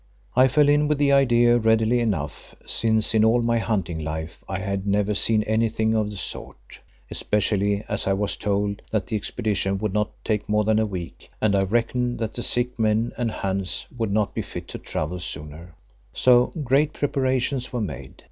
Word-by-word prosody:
I 130 +1 +6
fell 145 +2 +3
in 145 +1 +4
with 150 -1 +1
the 140 0 +3
idea 120 -3 +4
readily 110 +1 +3
enough, 90 -11 -3
since 110 -1 +1
in 110 -1 +4
all 115 +2 +4
my 115 0 +2
hunting 90 -8 -2
life 80 +2 -5
I 95 - -2
had 100 +1 -3
never 100 +1 +1
seen 105 +2 +2
anything 110 0 +1
of 110 -2 +1
the 105 - -6
sort, - - -7 0.3
especially 100 0 0
as 105 -1 -2
I 95 - +3
was 100 +1 -1
told 100 0 -1
that 105 -4 -1
the 110 - -3
expedition 100 -2 -1
would 105 -1 -2
not 105 0 +1
take 105 -2 -1
more 105 0 +2
than 110 +1 +2
a 110 - +1
week 90 -4 -7
and 105 -2 +2
I 100 - +3
reckoned 120 +4 0
that 110 -2 -3
the 120 - -4
sick 120 0 -1
men 110 +1 +1
and 120 -2 -1
Hans 95 -4 -2
would 115 -4 -2
not 105 0 0
be - - -2
fit - - -8
to - - -6
travel 85 +4 -4
sooner. 80 0 -7 0.4
So 125 -1 +5 0.2
great 140 +4 +2
preparations 130 -2 -1
were 125 - -2
made. 70 - -6
110 Hz, 190 wpm, -24 LUFS, 100-120 Hz, 0.4 s, I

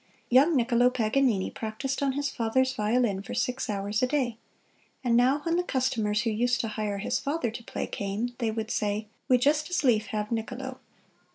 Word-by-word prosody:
Young 285 +6 +6
Niccolo 245 -1 +4
Paganini 235 -3 +1
practised 225 +6 -4
on 275 -1 +1
his 285 +1 -1
father's 260 +2 +1
violin 215 -3 +1
for - - -7
six 250 -1 -1
hours 205 +1 -1
a 255 - +3
day; 255 -4 0 0.7
and 240 -2 +2
now 260 +4 +4
when 335 +2 +1
the 355 - +1
customers 225 -8 0
who 230 - 0
used 245 +3 +1
to 225 - -3
hire 210 -1 -2
his 195 - -1
father 280 -4 -1
to 235 +1 -8
play - - -4
came, 205 +5 -3
they 230 -3 0
would 220 0 -3
say, 210 +1 -1 0.2
"We 255 - +5
just 295 +5 +2
as 355 -3 0
lief 220 -5 +3
have 210 0 -3
Niccolo." 250 +3 -4
240 Hz, 190 wpm, -28 LUFS, 215-265 Hz, 0.7 s, Young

